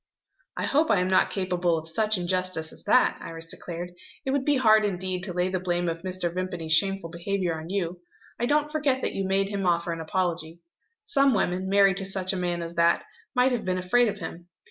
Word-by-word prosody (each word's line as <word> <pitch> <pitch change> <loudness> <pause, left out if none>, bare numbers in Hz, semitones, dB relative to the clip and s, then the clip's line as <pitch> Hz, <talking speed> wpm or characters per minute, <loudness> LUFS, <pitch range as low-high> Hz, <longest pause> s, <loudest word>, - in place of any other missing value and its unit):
"I - - -1
hope 305 +3 +2
I 210 - +4
am 180 - +1
not 190 - +4
capable 180 -3 0
of 160 0 -6
such 215 +5 +1
injustice 180 -2 -1
as - - -14
that," - - +3
Iris 165 0 -7
declared. 175 +1 -6 0.3
"It 265 - 0
would 275 -1 0
be 290 -2 +3
hard 220 -4 +5
indeed 185 -2 -2
to 185 0 -2
lay 180 +1 0
the 185 0 -1
blame 175 -1 -1
of 165 0 -3
Mr. 185 -2 -2
Vimpany's 175 -3 -2
shameful 195 -1 +2
behaviour 180 +1 -2
on 160 +1 -7
you. 180 -2 -2 0.4
I 240 - 0
don't 300 +1 +1
forget 285 -4 +1
that - - -2
you 195 - -2
made 195 +1 +1
him 200 -2 -2
offer 170 0 +1
an 165 -1 -4
apology. 170 -1 -2 0.4
Some 275 - +3
women, 185 -1 0
married 195 -1 +4
to 195 - -3
such 190 -1 -1
a - - -2
man 175 -2 -2
as 165 0 -6
that, 170 0 +3 0.3
might 250 +1 +4
have 245 -3 -1
been 185 0 -1
afraid 210 +7 +3
of 205 - -2
him. 170 -1 -8
185 Hz, 220 wpm, -26 LUFS, 175-200 Hz, 0.4 s, hard